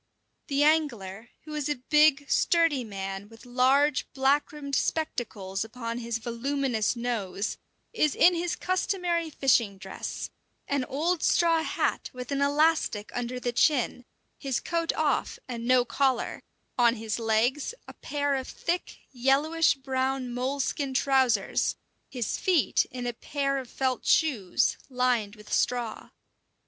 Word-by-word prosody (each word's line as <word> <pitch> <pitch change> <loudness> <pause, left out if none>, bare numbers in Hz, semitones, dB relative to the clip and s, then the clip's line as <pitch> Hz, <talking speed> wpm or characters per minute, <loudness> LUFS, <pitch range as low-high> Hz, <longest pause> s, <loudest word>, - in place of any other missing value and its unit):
The 280 +1 +2
angler, 240 -9 0
who 305 - -9
is 300 -1 -2
a 295 - +1
big, 300 +3 +3
sturdy 330 -6 +2
man 195 -1 -6
with 225 +2 -15
large, 260 +3 +2
black 270 +2 +2
rimmed 285 -2 -8
spectacles 215 -11 -1
upon 230 +1 -5
his 230 -1 -2
voluminous 240 0 -1
nose, 220 -4 -3 0.3
is 305 -10 +2
in 360 - +6
his 345 0 -1
customary 360 -2 -1
fishing 235 -9 +2
dress 190 0 -6 0.4
an 280 -2 0
old 320 +6 -1
straw 335 -2 +3
hat - - -1
with 250 +2 -7
an 280 0 0
elastic 290 -7 +2
under 245 +1 -3
the 245 -1 -2
chin, 250 0 +2 0.4
his 270 -4 -1
coat 335 0 -1
off, 310 -3 0
and 235 -2 -5
no 250 -1 +4
collar, 260 -1 0 0.4
on 240 -1 +5
his 220 0 -3
legs 235 - +1
a - - -9
pair 285 -1 -2
of 265 -1 -2
thick, 350 +1 -3
yellowish 280 +6 +2
brown 265 -1 -2
moleskin 265 +2 -2
trousers, 265 -3 +2 0.3
his 245 -4 -3
feet 335 - +2
in 250 -1 -6
a 240 - -2
pair 275 +3 -2
of 255 -3 -9
felt 260 -2 -1
shoes, 240 - +2
lined 250 -5 0
with 210 -1 -10
straw. 240 -2 -1
260 Hz, 135 wpm, -27 LUFS, 235-295 Hz, 0.4 s, in